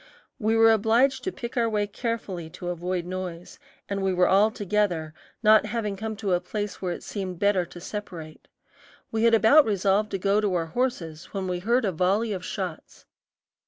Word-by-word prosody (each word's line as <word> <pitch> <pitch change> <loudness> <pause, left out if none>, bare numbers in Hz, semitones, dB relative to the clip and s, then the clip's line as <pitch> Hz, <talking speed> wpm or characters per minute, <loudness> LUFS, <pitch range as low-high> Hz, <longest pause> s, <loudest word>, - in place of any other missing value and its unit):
We 220 -1 +1
were 225 0 +7
obliged 225 +5 +3
to 375 - -1
pick 235 -8 -7
our 235 -2 +2
way 210 -1 0
carefully 205 -6 -4
to 175 - -5
avoid 175 0 -3
noise, 180 -1 -6 0.3
and 200 -1 -3
we 190 0 +1
were 180 0 +4
all 200 +3 +5
together, 200 -7 -1 0.3
not 215 0 +6
having 210 -2 -2
come 220 +2 -4
to 200 -3 -1
a 175 - +3
place 205 +2 -5
where 185 -2 -2
it - - -6
seemed 190 -3 -5
better 195 -2 +2
to 175 - -11
separate. 175 -5 -8 0.6
We 225 +1 +1
had 230 -1 +6
about 225 +8 +6
resolved 205 0 +1
to 195 - -2
go 200 +2 +2
to 200 -3 0
our 165 -2 0
horses 165 -5 -3
when 195 -2 -3
we 180 -1 -2
heard 235 +5 +1
a 195 - +1
volley 195 +6 +1
of 185 -2 -5
shots. 185 -4 -6
200 Hz, 195 wpm, -26 LUFS, 180-220 Hz, 0.6 s, were